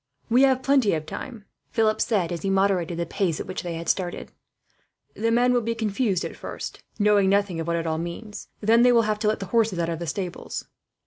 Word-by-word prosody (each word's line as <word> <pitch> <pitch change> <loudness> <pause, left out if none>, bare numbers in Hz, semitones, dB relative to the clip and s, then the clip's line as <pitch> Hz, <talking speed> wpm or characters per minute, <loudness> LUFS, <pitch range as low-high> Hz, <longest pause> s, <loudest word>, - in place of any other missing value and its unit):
"We 245 +3 +5
have 260 -1 +4
plenty 270 -9 +3
of 155 -1 -4
time," 220 +6 -7 0.2
Philip 215 -1 +1
said, 195 -7 +1
as 170 -2 -3
he 195 - -1
moderated 190 -3 +1
the 170 - -1
pace 170 -2 -1
at - - -4
which 185 0 -5
they 175 -2 -4
had 165 0 -6
started. 180 -1 -2 0.8
"The 225 +1 -1
men 245 +2 +3
will 245 - +3
be 230 +1 -2
confused 210 -3 0
at - - -6
first, - - -7 0.2
knowing 205 -2 +4
nothing 200 -3 +1
of 165 - -4
what 170 - +1
it 165 0 -2
all 160 -1 -1
means. 175 +6 -6
Then 225 +2 +4
they 250 0 +6
will 235 -1 +5
have 210 -1 -1
to 215 - 0
get 215 - +1
the 195 - -4
horses 225 -5 +2
out 170 -1 0
of 165 -1 -3
the 170 - -5
stables." 180 +1 -4
200 Hz, 235 wpm, -25 LUFS, 170-230 Hz, 0.8 s, they